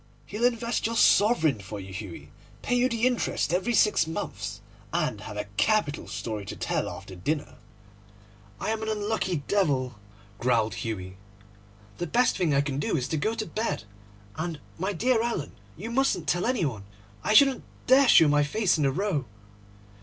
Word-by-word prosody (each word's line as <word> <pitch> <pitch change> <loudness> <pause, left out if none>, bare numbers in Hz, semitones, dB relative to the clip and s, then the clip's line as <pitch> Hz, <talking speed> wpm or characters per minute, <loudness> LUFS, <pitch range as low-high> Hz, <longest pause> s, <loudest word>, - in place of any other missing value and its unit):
He'll 210 - -1
invest 235 -1 0
your 230 - -3
sovereign 165 - +4
for 100 +1 -7
you, 95 0 -9
Hughie, 85 -7 -8 0.3
pay 245 - +1
you 250 +1 +3
the 230 -1 0
interest 245 -9 0
every 195 +6 +1
six 210 -7 +4
months, 165 +6 -5 0.3
and - - -1
have - - -7
a - - -1
capital 210 -10 +1
story 110 -3 -4
to - - -5
tell - - -1
after - - -9
dinner.' 145 - -2 1.1
'I - - -2
am 220 0 -2
an 220 - -3
unlucky 205 -7 -1
devil,' 135 - +1 0.4
growled 115 -4 +2
Hughie. 95 -3 -5 0.8
'The 175 - -2
best 245 +7 +2
thing 175 -5 +1
I 140 0 +4
can 140 -1 -3
do 145 - 0
is 125 - -2
to - - -1
go 220 +9 0
to 220 - -3
bed; 210 - -2 0.5
and, 160 -1 -3 0.2
my 190 +3 0
dear 230 +5 +2
Alan, 230 -11 -2 0.3
you 220 +8 -6
mustn't 270 +3 +1
tell 175 +4 +1
any 250 -9 +1
one. 110 -8 -4 0.4
I 215 - +2
shouldn't 275 +1 +6 0.2
dare 265 +1 +6
show 165 - +7
my 145 0 +4
face 190 +4 +1
in 150 - +1
the 135 - +3
Row. 170 -3 -1
175 Hz, 175 wpm, -27 LUFS, 135-225 Hz, 1.1 s, show